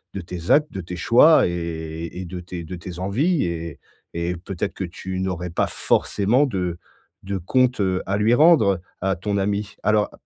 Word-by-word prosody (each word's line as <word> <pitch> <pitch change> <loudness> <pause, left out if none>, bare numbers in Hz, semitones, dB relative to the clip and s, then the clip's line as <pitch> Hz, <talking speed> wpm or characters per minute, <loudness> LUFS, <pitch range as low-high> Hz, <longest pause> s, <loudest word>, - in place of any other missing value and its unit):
de 100 - -3
tes 85 0 -7
actes, 150 +1 +4
de 95 - -5
tes 90 +1 -7
choix 120 - +6
et - - -2
et 85 0 -5
et - - -6
de 90 +1 -6
tes 90 -1 -7
de 85 +3 -7
tes 85 0 -8
envies 135 - +1
et 85 -3 -5 0.3
et 85 +1 -2
peut-être 90 +1 -4
que - - -5
tu 95 +2 -6
n'aurais 90 -2 -3
pas - - 0
forcément 115 +8 +2
de 90 -7 -2 0.5
de 100 0 -3
compte, 125 +7 +1
heu, 95 -1 0
à 100 - 0
lui 110 +3 +3
rendre, 130 - +5 0.2
à 95 0 +1
ton 100 +4 -2
ami. 100 +1 -2
Alors, 105 -1 +2
95 Hz, 195 wpm, -22 LUFS, 85-105 Hz, 0.5 s, choix